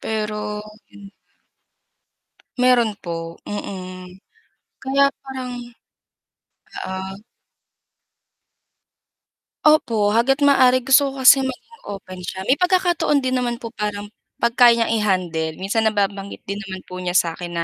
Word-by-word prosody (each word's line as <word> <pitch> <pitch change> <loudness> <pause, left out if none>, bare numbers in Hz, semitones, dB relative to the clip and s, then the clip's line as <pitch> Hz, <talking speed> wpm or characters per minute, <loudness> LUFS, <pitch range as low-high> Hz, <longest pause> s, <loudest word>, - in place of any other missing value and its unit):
Pero, 210 -1 -3 0.3
hmm. 200 0 -14 1.5
Meron 250 -3 +4
po 170 -2 -4 0.3
mhm, 185 -3 -7 0.7
kaya 275 +1 +2
parang 260 -2 -6 1.3
Oo. 190 +2 -6 2.4
Opo 230 -9 +3
hangga't 270 +6 +2
maaari 255 -3 +5
gusto 270 +2 +5
ko 270 -1 -6
kasi 270 +2 +9
maging 270 - -6
open 190 -2 -8
siya, 190 +1 -6
may 260 +7 +1
pagkakataon 350 -6 +2
din 255 - -1
naman 240 -1 -1
po 230 - -6
parang 210 -2 -4 0.2
pag 235 - 0
kaya 235 -1 +7
n'yang - - -2
i-handle 175 -6 -1
minsan 215 +5 0
nababanggit 200 -1 -2
din 200 +1 -5
naman 190 -1 -7
po 185 0 -9
niya 180 0 -3
sa 170 -2 +3
akin 175 +1 -7
na 170 - 0
210 Hz, 125 wpm, -21 LUFS, 190-260 Hz, 2.4 s, kasi